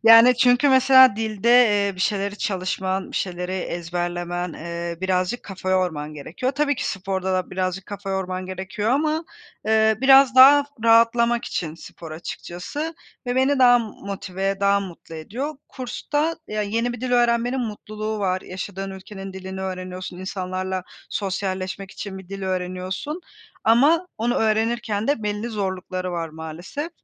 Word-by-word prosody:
Yani 230 +2 +8
,çünkü 245 +3 +4
mesela 260 -3 +7
dilde, 220 0 -1
eee, 210 -5 +5
bir 185 - -9
şeyleri 200 +1 -1
çalışman, 190 0 -2
bir - - -4
şeyleri 180 0 -3
ezberlemen, 175 0 -3
eee, 170 +1 -5
birazcık 185 +4 0
kafa 190 -1 -5
yorman 160 -5 0
gerekiyor. 170 - -3
Tabii 285 0 +1
ki - - -3
sporda 190 -1 -2
da 185 -1 -1
birazcık 185 0 -2
kafa 200 -1 -6
yorman 185 -1 -3
gerekiyor 190 +4 -3
ama, 310 +4 +1 0.4
eee, 220 0 +4
biraz 270 -1 +7
daha 280 +2 +9 0.2
rahatlamak 230 +1 +4
için 160 -2 -3
spor 165 -1 -11
açıkçası. 180 - -6 0.3
Ve 245 +1 -1
beni 265 +2 +3
daha 245 -1 +7
m 235 - -2
motive, 195 -2 -4
daha 200 0 +3
mutlu 175 -3 -9
ediyor. 240 - -5
Kursta, 290 +5 -2
ya, 215 0 -1
yeni 230 +4 -1
bir 240 - -8
dil 250 0 -2
öğrenmenin 240 +1 +2
mutluluğu 215 -1 -4
var. 185 -2 0
Yaşadığın 195 +1 -6
ülkenin 195 0 -8
dilini 190 0 -7
öğreniyorsun, 185 -1 -5
insanlarla 185 0 -3 0.3
sosyalleşmek 190 -1 -3
için 195 -2 -7
bir 190 - -13
dil 195 0 -6
öğreniyorsun. 185 - -3 0.4
Ama 290 +10 +4
onu 240 +2 +1
öğrenirken 220 -1 0
de 285 -6 +1
belli 210 +2 -2
zorlukları 185 -3 -3
var 165 -1 -3
maalesef. 160 - -6
200 Hz, 145 wpm, -23 LUFS, 185-240 Hz, 0.4 s, daha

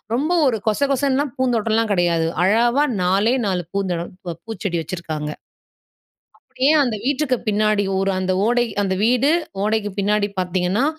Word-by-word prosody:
ரொம்ப 295 +8 0
ஒரு 245 -4 +2
கொச 215 - 0
கொசன்னுலாம் 275 0 0
பூந்தோட்டம்லாம் 225 -3 +1
கிடையாது, 170 -3 +1 0.2
அளவா 235 +8 +3 0.2
நாலே 195 +6 +2
4 185 -3 0
பூந்தோட 185 -4 -1 0.3
ப 170 - -3
பூச்செடி 210 -6 -3
வச்சுருக்காங்க. 155 -3 -5 1.1
அப்படியே 275 +4 0
அந்த 240 -4 -1
வீட்டுக்கு 280 -2 +1
பின்னாடி 215 -1 +2
ஒரு 195 0 +1
அந்த 185 0 0
ஓடை 240 +1 +2 0.2
அந்த 190 -1 0
வீடு 250 +5 +3 0.3
ஓடைக்கு 215 -1 0
பின்னாடி 205 +1 +1
பாத்தீங்கன்னா, 180 +5 0
215 Hz, 135 wpm, -20 LUFS, 185-245 Hz, 1.1 s, அளவா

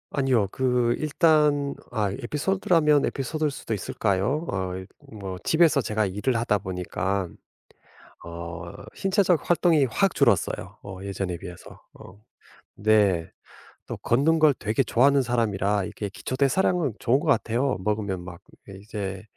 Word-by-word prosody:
아니요. 130 -7 +1
그 125 -2 +1
일단 150 -2 +2 0.2
아 105 -3 0
에피소드라면 150 - +1
에피소드일 150 +3 -2
수도 115 - -5
있을까요? 105 - -1
아이 95 -1 -3 0.3
뭐 95 -3 -6
집에서 160 -3 +4
제가 110 -2 0
일을 105 +6 -1
하다 115 -2 +1
보니깐 95 0 -3 0.9
어 85 0 -7 0.3
신체적 190 -4 +1
활동이 170 -4 +4
확 190 - 0
줄었어요 120 - +1
어 95 -2 -8
예전에 95 -3 -3
비해서. 90 -1 -11
어 95 +3 -14 0.6
네. 100 -6 +2 0.6
또 - - -5
걷는 145 +7 +2
걸 155 -2 +5
되게 115 +2 -1
좋아하는 135 +3 +3
사람이라 105 -4 0
이렇게 100 +2 -5
기초대사량은 140 - 0
좋은 130 +4 +2
것 150 - -6
같아요. 130 -1 +1
먹으면 100 -2 -2
막 90 -1 -10 0.4
이제 100 -2 -6
115 Hz, 295 characters per minute, -25 LUFS, 95-145 Hz, 0.9 s, 걸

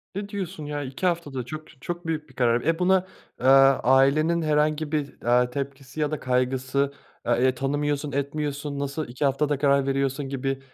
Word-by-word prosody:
Ne 200 +1 -4
diyorsun, 185 -6 -5
ya? 145 0 -3
2 135 +7 -5
haftada 150 -8 -1
çok 155 -1 -9
çok 175 -1 -5
büyük 155 -2 -3
bir 130 - -19
karar. 120 -1 +2
E, 165 +4 0
buna, 185 0 +3 0.3
aaa, 135 +1 +6
ailenin 140 +6 +4
herhangi 150 0 +1
bir, 145 -3 -3
aaa, 125 +1 +3
tepkisi 140 +1 -6
ya 150 0 0
da 155 - -2
kaygısı 130 +2 0 0.3
a 120 - +3
e, 130 +1 +2
tanımıyorsun, 145 +2 -1
etmiyorsun, 140 0 -3
nasıl 140 +2 -3
2 125 +5 -2
haftada 145 +1 +1
karar 140 -1 +3
veriyorsun 135 0 -1
gibi 135 0 -2
140 Hz, 175 wpm, -25 LUFS, 135-155 Hz, 0.3 s, aaa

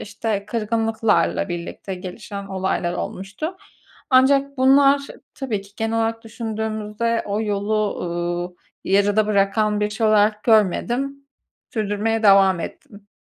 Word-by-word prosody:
işte 205 -1 -3
kırgınlıklarla 225 -1 0
birlikte 175 +2 -5
gelişen 200 +2 -7
olaylar 190 -2 -1
olmuştu. 205 - -5 0.5
Ancak 275 +1 +4
bunlar 275 +2 +5 0.3
tabii 240 -7 -3
ki 200 - -17
genel 225 +1 -1
olarak 225 0 -1
düşündüğümüzde 220 0 -3
o 205 +1 -1
yolu, 210 0 -1
ııı, 175 +1 -3 0.3
yarıda 205 +2 +3
bırakan 210 +1 +1
bir 210 0 0
şey 220 +1 0
olarak 210 0 +3
görmedim. 240 +6 +1 0.5
Sürdürmeye 220 +1 -1
devam 195 -3 +5
ettim. 200 +4 -9
215 Hz, 115 wpm, -21 LUFS, 200-225 Hz, 0.5 s, bunlar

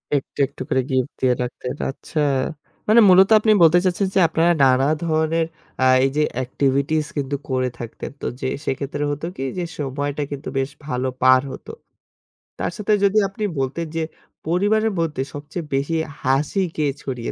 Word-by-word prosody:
একটু, 140 +1 -4
একটু - - -13
করে 130 - +2
গিফট 130 0 0
দিয়ে 130 -1 +4
রাখতেন, 125 +1 -5
আচ্ছা। 145 +3 -5 0.7
মানে 220 +2 +6
মূলত 190 +1 +7
আপনি 215 0 +3
বলতে 165 +1 +6
চাচ্ছেন 185 +2 +1
যে - - +5
আপনারা 165 +2 +2
নানা 130 +1 +4 0.2
ধরনের 160 0 +1 0.4
আ - - +4 0.2
এই - - +2
যে - - +4 0.2
এক্টিভিটিস 140 +4 0
কিন্তু 140 0 -1
করে 130 -1 0
থাকতেন। 115 -1 -7
তো - - -5 0.2
যে 130 - -1 0.2
সেক্ষেত্রে 140 +2 -2
হতো 145 +2 -4
কি 135 - -3
যে 180 - -1
সময়টা 145 +1 -3
কিন্তু 145 +1 -6
বেশ 135 0 0 0.2
ভালো 125 -3 -1
পার 130 0 +6
হত। - - -10 0.9
তার - - -1
সাথে 210 0 +1
যদি 200 +1 +3
আপনি 195 +2 -7 0.2
বলতেন 135 +5 -2
যে 165 - 0 0.4
পরিবারের 205 +6 +2
মধ্যে 155 -5 -1
সবচেয়ে 150 +4 -6
বেশি 140 +4 0 0.3
হাসি 140 +8 +1
কে 155 - 0 0.2
ছড়িয়ে 125 -3 -4
145 Hz, 165 wpm, -21 LUFS, 130-170 Hz, 0.9 s, মূলত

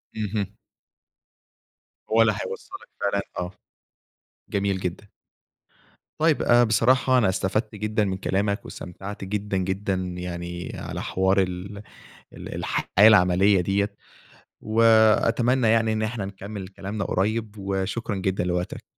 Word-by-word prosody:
اهم. 105 -2 -2 1.6
هو 115 +1 +5
اللي 110 -2 +4
هيوصلك - - -8
فعلًا، 100 0 +1 0.2
آه. 90 0 -3 1.0
جميل 100 -1 -1
جدًا. 90 +3 -5 1.1
طيب، 160 -1 +3
آآ، 120 0 +5
بصراحة 125 +4 +3
أنا 110 -6 +3
استفدت 105 +4 -1
جدًا 105 +1 0
من 95 -1 -2
كلامك، 100 +2 -1
واستمتعت 95 +3 -8
جدًا 100 0 -2
جدًا 95 +2 -1 0.2
يعني 85 0 -5
على - - -5
حوار 95 +1 +2
ال 95 +2 -4 0.5
ال - - -8
الحياة - - -2 0.2
العملية 95 -1 +5
دِيّة، 100 +3 0 0.7
وأتمنى 115 +2 +4
يعني 110 0 +3
إن 110 - -1
إحنا 110 -2 -2
نكمل 100 0 -7
كلامنا 100 +2 -5
قريّب، 110 +2 -1
وشكرًا 100 +3 -2
جدًا 95 -1 -1
لوقتك. 90 0 -3
100 Hz, 115 wpm, -24 LUFS, 95-110 Hz, 1.6 s, هو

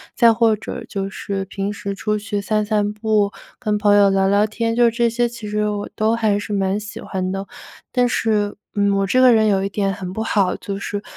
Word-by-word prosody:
再 235 -2 +6
或 225 -1 +3
者 210 - -7
就 195 -1 -3
是 195 0 -4
平 195 +1 -4
时 200 -1 -5
出 210 +1 -1
去 205 -1 -3
散 215 +1 0
散 210 -1 0
步、 210 -1 +1 0.3
跟 210 -4 0
朋 205 0 +3
友 200 -1 +6
聊 195 0 +2
聊 205 +2 +3
天， 230 +1 -2
就 240 -1 +5
这 235 +1 +1
些， 240 +1 0
其 230 -2 -8
实 210 0 0
我 205 -1 -3
都 220 +2 +2
还 215 -3 +1
是 210 - -7
蛮 195 0 0
喜 205 0 -8
欢 185 -1 -3
的。 195 +1 -4 0.5
但 245 -1 +2
是， 210 -3 0 0.2
嗯， 200 -1 +2
我 195 - +1
这 255 +7 +2
个 255 -1 +7
人 220 -1 +4
有 195 -2 +2
一 195 - -1
点 195 -1 -1
很 185 0 -6
不 220 +3 -2
好， 200 -4 +1
就 200 -1 -5
是， 205 0 -4
210 Hz, 245 characters per minute, -20 LUFS, 200-220 Hz, 0.5 s, 个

